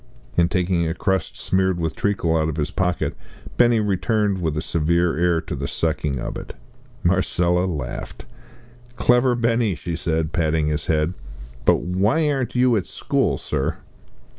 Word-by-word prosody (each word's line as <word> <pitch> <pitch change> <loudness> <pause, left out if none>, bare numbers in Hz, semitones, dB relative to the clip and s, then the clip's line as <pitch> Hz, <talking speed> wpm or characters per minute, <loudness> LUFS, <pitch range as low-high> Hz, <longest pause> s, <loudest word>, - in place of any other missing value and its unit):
And 85 0 +3
taking 90 -3 +1
a 80 - -2
crust 95 +1 -1
smeared 95 -1 +1
with 80 -2 -2
treacle 95 -5 0
out 80 -1 +1
of 80 - -4
his 75 -1 -1
pocket, 90 +1 -1 0.4
Benny 120 -2 +4
returned 105 -1 0
with 80 -3 -1
a - - 0
severe 85 +2 +1
air 85 0 +2
to - - -5
the - - -3
sucking 75 -4 -1
of - - -4
it. - - -8 0.5
Marcella 90 0 +2
laughed. 75 -8 -5 0.7
"Clever 125 +1 +3
Benny," 115 -4 +1
she 85 +2 -4
said, 80 -1 -1
patting 80 -2 +1
his 75 -1 -2
head; 80 +2 +1 0.5
"but - - +4
why 100 - +1
aren't 135 -3 -2
you 125 -1 +4
at 95 - -3
school, - - 0
sir?" - - -2
90 Hz, 160 wpm, -22 LUFS, 80-100 Hz, 0.7 s, Benny